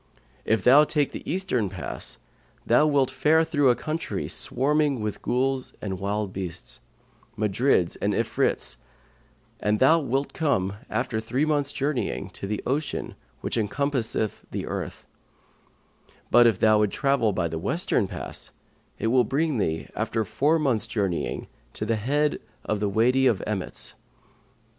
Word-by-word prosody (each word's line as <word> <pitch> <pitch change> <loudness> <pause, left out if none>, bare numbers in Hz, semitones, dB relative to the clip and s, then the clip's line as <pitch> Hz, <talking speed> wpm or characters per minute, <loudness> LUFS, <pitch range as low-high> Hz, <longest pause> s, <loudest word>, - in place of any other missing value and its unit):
If 110 -2 +1
thou 135 +5 +8
take 150 -2 0
the - - -6
eastern 145 - 0
pass, - - -5 0.5
thou 150 - +4
wilt 140 -3 +2
fare 150 +5 +3
through 145 -4 +2
a 120 - +4
country 155 +5 -3
swarming 145 +1 +1
with 105 -1 -4
Ghuls 130 +1 0
and 95 -3 -4
wild 100 0 -2
beasts, 90 -2 -6 0.6
Marids 105 -3 +2
and - - +1
Ifrits, 60 - 0 0.8
and 105 +1 +1
thou 155 +8 +5
wilt 135 -1 -1
come, 100 - 0 0.2
after 110 - -1
three 125 +6 0
months' 145 -2 +1
journeying, 140 -2 -2
to 100 - -6
the 105 0 -3
ocean 145 +4 -2 0.3
which - - -1
encompasseth 110 0 -1
the - - -4
earth; - - -5 1.3
but, 120 0 +7
if 110 -5 +2
thou 110 0 +4
travel 135 0 +1
by 95 -3 0
the 80 0 -4
western 140 - 0
pass, 90 -3 -6 0.5
it - - -4
will 130 -1 +5
bring 145 0 0
thee, 80 -5 -1
after 110 0 -1
four 140 +10 +2
months' 125 -8 +1
journeying, 100 -6 -2 0.3
to - - -4
the 115 - +1
head 145 +7 +1 0.3
of 105 - -1
the 105 0 0
Wady 125 +6 +3
of 115 -7 +1
Emmets. 90 - -1
120 Hz, 145 wpm, -25 LUFS, 105-145 Hz, 1.3 s, thou